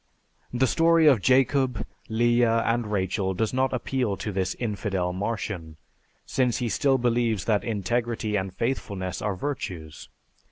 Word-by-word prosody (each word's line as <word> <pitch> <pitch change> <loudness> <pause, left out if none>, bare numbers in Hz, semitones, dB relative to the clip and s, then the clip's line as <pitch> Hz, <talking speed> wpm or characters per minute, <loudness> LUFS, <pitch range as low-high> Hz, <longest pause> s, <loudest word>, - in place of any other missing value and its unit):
The 125 +2 +2
story 165 +4 +4
of 135 -9 +6
Jacob, 130 -2 +2 0.2
Leah, 120 0 +3
and 115 -2 0
Rachel 95 -1 -1
does 110 +4 -1
not 130 0 +1
appeal 125 -4 -1
to 105 - -4
this 95 -1 -1
infidel 100 -5 -2
Martian, 90 -5 -4 0.5
since 125 -5 +1
he 120 - -1
still 135 +3 +2
believes 120 -5 +1
that 105 -3 +1
integrity 115 0 -1
and 95 -1 -1
faithfulness 95 -5 -3
are 105 -3 -1
virtues. 90 - -5
115 Hz, 135 wpm, -26 LUFS, 95-125 Hz, 0.5 s, of